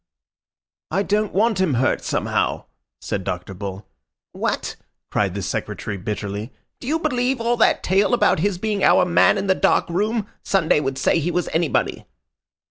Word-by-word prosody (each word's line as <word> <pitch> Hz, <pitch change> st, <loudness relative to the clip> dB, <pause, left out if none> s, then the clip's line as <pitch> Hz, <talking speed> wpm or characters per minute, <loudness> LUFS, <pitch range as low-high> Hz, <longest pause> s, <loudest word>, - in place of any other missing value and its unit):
"I 195 Hz, +5 st, 0 dB
don't 210 Hz, +1 st, 0 dB
want 210 Hz, 0 st, +2 dB
him 165 Hz, -8 st, +2 dB
hurt, 130 Hz, +2 st, +1 dB
somehow," -, -, -1 dB, 0.4 s
said 95 Hz, -, -3 dB
Dr. 90 Hz, +2 st, -4 dB
Bull. 95 Hz, 0 st, -7 dB, 0.4 s
"What!" -, -, -2 dB, 0.4 s
cried -, -, 0 dB
the -, -, -3 dB
Secretary 105 Hz, -, -4 dB
bitterly. 105 Hz, +3 st, -4 dB, 0.3 s
"Do -, -, -9 dB
you 310 Hz, +3 st, +2 dB
believe 260 Hz, -5 st, 0 dB
all 235 Hz, +1 st, +1 dB
that 225 Hz, -, +3 dB
tale 195 Hz, +5 st, +3 dB
about 235 Hz, -, +3 dB
his 195 Hz, +2 st, 0 dB
being 205 Hz, 0 st, -2 dB
our 180 Hz, -, +5 dB
man 180 Hz, +3 st, +4 dB
in 195 Hz, -, -2 dB
the 190 Hz, -, +4 dB
dark -, -, +2 dB
room? 210 Hz, +4 st, 0 dB, 0.2 s
Sunday 170 Hz, -6 st, +2 dB
would 135 Hz, -2 st, -2 dB
say 135 Hz, -, +2 dB
he 165 Hz, +2 st, -1 dB
was 175 Hz, 0 st, -1 dB
anybody." 165 Hz, -2 st, 0 dB
185 Hz, 165 wpm, -22 LUFS, 130-215 Hz, 0.4 s, our